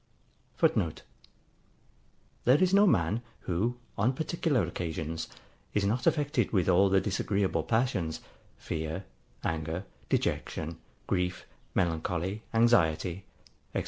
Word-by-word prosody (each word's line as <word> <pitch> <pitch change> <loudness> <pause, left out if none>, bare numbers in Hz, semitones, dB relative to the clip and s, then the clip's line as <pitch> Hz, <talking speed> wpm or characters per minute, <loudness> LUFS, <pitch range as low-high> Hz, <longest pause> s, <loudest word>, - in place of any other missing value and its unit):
[Footnote: - - +1 1.4
There 125 +3 +6
is 185 +2 +3
no 205 +1 +7
man, 95 - +2 0.2
who, 105 +8 -1 0.2
on 120 +6 +3
particular 155 - 0
occasions, 80 -1 -3 0.5
is 105 -1 +2
not 115 +5 0
affected 145 -7 +2
with 95 -5 +2
all 95 +2 +5
the 95 0 +5
disagreeable 100 -3 0
passions, 105 -8 0 0.4
fear, 80 +4 -4 0.4
anger, 80 +3 -2 0.2
dejection, 80 +1 -1 0.3
grief, 90 -1 -1 0.3
melancholy, 90 +3 0
anxiety, 95 -6 +3 0.5
&c. - - +3
95 Hz, 105 wpm, -30 LUFS, 85-120 Hz, 1.4 s, no